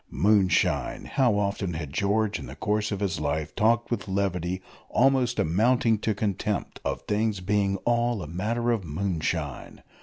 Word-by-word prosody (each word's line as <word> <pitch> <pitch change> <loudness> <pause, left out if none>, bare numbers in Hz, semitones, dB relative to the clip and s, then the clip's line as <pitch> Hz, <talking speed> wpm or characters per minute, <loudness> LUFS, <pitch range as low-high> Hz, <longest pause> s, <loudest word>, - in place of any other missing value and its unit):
Moonshine! 100 -3 +2
How 125 -6 +2
often 100 -3 -1
had 75 -3 -5
George 105 +3 +1
in - - -8
the 65 - -9
course 105 +6 -1
of 100 -1 -3
his 95 -6 -1
life 75 +1 -2
talked 115 +2 +2
with 120 - -2
levity, 95 -2 -1 0.3
almost 130 -1 +3
amounting 110 +6 +2
to 110 0 -1
contempt, 100 0 -2
of - - -3
things 105 -1 0
being 100 +1 +1
"all 120 -3 +1
a - - -7
matter 115 +9 -1
of 115 -4 0
moonshine!" 80 -4 -3
100 Hz, 155 wpm, -26 LUFS, 90-110 Hz, 0.3 s, almost